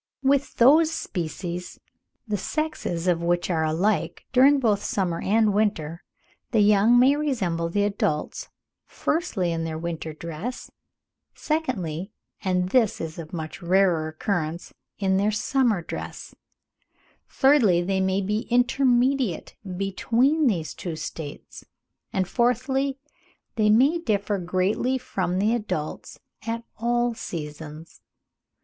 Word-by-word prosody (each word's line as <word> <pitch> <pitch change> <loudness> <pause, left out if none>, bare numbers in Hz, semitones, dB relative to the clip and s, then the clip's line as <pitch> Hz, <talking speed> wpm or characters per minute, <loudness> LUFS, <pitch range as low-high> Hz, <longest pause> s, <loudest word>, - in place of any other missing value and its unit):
With 280 +1 +2
those 305 +7 +6
species, 175 - -5 0.5
the 210 - -1
sexes 205 - -3
of 170 -2 +2
which 175 +1 0
are 160 -2 +1
alike 175 +7 0
during 275 +3 +6
both 215 -6 +2
the - - -9
summer 175 -4 -1
and 215 0 +3
winter, 175 -6 0 0.5
the 225 -3 +3
young 210 +3 +5
may 260 +3 +6
resemble 195 - -1
the 205 +4 +1
adults, 195 -7 -2 0.4
firstly, 230 - -1
in 165 0 -2
their 160 -1 -3
winter 165 -1 -4
dress; 170 +10 -6 0.6
secondly, 195 - -2 0.3
and 180 -1 0
this 230 -2 +2
is 160 0 -5
of 160 -1 -8
much 160 -3 -6
rarer 175 -3 +2
occurrence, 160 0 -3 0.2
in 190 -2 +1
their 200 +2 +2
summer 215 -2 +1
dress; - - -7 1.0
thirdly, 240 -11 +4
they 190 +1 0
may 190 +1 +1
be 210 +3 -2
intermediate 245 - +2 0.2
between 245 - +2
these 165 -9 -1
two 170 -3 -5
states; 155 -2 -7 0.5
and, 190 -4 0
fourthly, 265 +4 0 0.6
they 215 -1 +3
may 270 +10 +4
differ 205 - -1
greatly 185 +8 0
from 185 -7 -2
the 210 +4 +2
adults 205 -10 -4 0.3
at 230 +1 -2
all 240 +1 +1
seasons. 155 -4 -8
200 Hz, 125 wpm, -25 LUFS, 170-245 Hz, 1.0 s, those